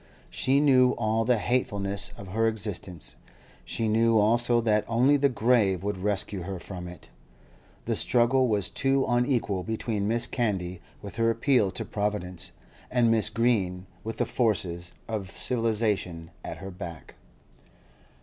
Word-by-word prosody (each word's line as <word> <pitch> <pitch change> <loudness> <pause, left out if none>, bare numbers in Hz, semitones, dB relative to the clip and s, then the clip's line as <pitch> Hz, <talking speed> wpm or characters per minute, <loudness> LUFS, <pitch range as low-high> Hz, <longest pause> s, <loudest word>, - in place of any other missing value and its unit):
She 135 +2 +2
knew 130 -3 +5
all 110 0 0
the 125 0 +3
hatefulness 100 -4 -1
of 100 - -9
her 115 +4 +1
existence; 100 -6 -3 0.5
she 115 - -2
knew 115 +1 +3
also 120 +3 +3
that 105 -2 +2
only 125 +5 +4
the 140 0 +3
grave 110 -6 +2
would 105 -1 -2
rescue 100 0 -1
her 95 +2 -5
from 90 0 -8
it. 90 -1 -11 0.8
The - - 0
struggle 125 +2 +3
was 105 -4 0
too 135 0 +1
unequal 120 -5 +1
between 110 0 -2
Mrs. 115 +1 0
Candy 95 -7 -1 0.2
with 100 - -8
her 115 0 +3
appeal 115 -2 +2
to 95 - -5
Providence, 100 -4 -3 0.4
and 120 -2 +3
Mrs. 110 -2 +1
Green 95 -6 +1 0.2
with 110 +1 -5
the - - +1
forces 90 -7 -1 0.2
of 105 -4 -4
civilisation 105 -8 -1
at - - -6
her 95 0 -8
back. 85 -3 -9
110 Hz, 145 wpm, -27 LUFS, 95-120 Hz, 0.8 s, knew